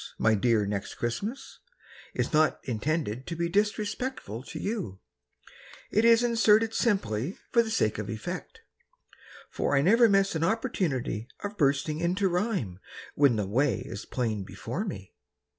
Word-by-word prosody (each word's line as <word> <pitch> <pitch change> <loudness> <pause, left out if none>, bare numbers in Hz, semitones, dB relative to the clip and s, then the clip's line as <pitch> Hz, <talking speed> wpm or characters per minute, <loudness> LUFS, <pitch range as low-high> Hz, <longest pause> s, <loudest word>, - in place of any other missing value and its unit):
My 110 - +3
dear 110 0 +2
Next 100 -1 -4
Christmas, 205 - -4 0.6
Is - - -1
not 155 0 +3
intended 130 -1 -2
to 170 - -3
be 170 +1 -1
Disrespectful 205 - -1
to 160 - -7
you; 195 - -3 0.9
It 215 +2 +3
is 230 0 +6
inserted 225 -1 +4
simply 175 - 0
For 235 - +5
the 225 - -3
sake 110 - +1
of 105 -1 -4
effect. 175 - -6 0.9
For 145 - 0
I 140 - +3
never 230 +6 +6
miss 195 -1 +3
an 160 -1 -1
opportunity 165 - -1 0.2
Of 205 0 -4
bursting 145 -1 +1
into 185 +3 +1
rhyme. 175 - -1 0.3
When 140 -4 +4
the 105 -2 -1
way 130 +8 +1
is 100 - -7
plain 110 -5 -2
before 115 - -5
me. 95 - -7
160 Hz, 145 wpm, -28 LUFS, -, 0.9 s, is